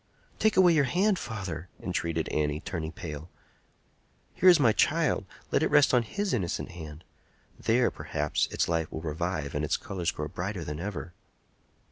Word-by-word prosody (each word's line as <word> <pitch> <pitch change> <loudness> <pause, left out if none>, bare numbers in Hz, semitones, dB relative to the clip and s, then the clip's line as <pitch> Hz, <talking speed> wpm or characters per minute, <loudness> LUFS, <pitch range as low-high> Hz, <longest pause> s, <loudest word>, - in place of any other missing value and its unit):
"Take 220 -3 +3
away 180 -2 +7
your 150 -3 +4
hand, 190 +8 +2
father!" 95 -6 -5
entreated 85 -3 -2
Annie, 75 0 0
turning 80 -3 -4
pale. 80 -1 -7 1.0
"Here 185 - +6
is 175 -3 +7
my 120 -6 +5
child; 145 - +2 0.2
let - - +3
it - - +2
rest 145 -2 +5
on 125 - +5
his 200 - -2
innocent 95 -5 -2
hand. 80 -2 -9 0.6
There, 120 +2 +2
perhaps, 75 -1 -1
its - - 0
life 80 -2 -1
will 80 - -5
revive 80 -2 -3
and 75 - -1
its 75 - +1
colors 90 -3 -3
grow 75 -3 -3
brighter 90 +2 -4
than 75 -1 -5
ever." 90 -4 -5
90 Hz, 165 wpm, -28 LUFS, 80-125 Hz, 1.0 s, away